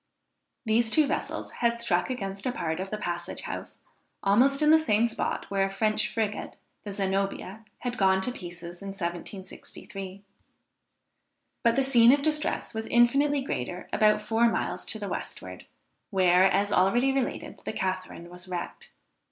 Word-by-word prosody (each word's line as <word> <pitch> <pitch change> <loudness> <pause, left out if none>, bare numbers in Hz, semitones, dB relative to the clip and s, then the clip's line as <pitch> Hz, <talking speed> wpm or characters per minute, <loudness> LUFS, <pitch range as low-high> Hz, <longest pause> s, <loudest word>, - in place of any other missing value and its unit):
These 225 +1 +3
two 305 +6 +5
vessels 285 - -3
had 235 0 +1
struck 180 -6 +1
against 195 -4 -3
a - - +1
part 165 -7 -3
of 190 +1 -4
the 215 - -3
Passage 175 -3 -3
House, - - -7 0.4
almost 260 +9 +4
in 300 - +6
the 320 - +7
same 225 -7 +2
spot 235 - -2
where 195 -1 +2
a - - -6
French 215 +2 +1
frigate, 215 -1 -3 0.3
the 205 - -6
Zenobia, 195 +1 -2 0.2
had 245 -1 -3
gone 190 -1 +4
to 250 - +1
pieces 175 -4 -9
in 200 - -7
1763. 190 +2 -7 1.4
But 235 -1 +4
the 270 - +3
scene 245 -3 +6
of 280 +1 +3
distress 305 0 0
was 220 0 -4
infinitely 275 +4 +3
greater 180 - -4
about 215 0 +3
four 230 +1 +3
miles - - -2
to - - -3
the - - -5
westward, - - -6 0.4
where, 185 -2 +4
as 200 +2 +2
already 240 +9 +3
related, 270 -2 -3
the - - -3
Catharine 185 -2 -4
was 180 +1 -10
wrecked. 180 -1 -6
205 Hz, 160 wpm, -27 LUFS, 185-240 Hz, 1.4 s, the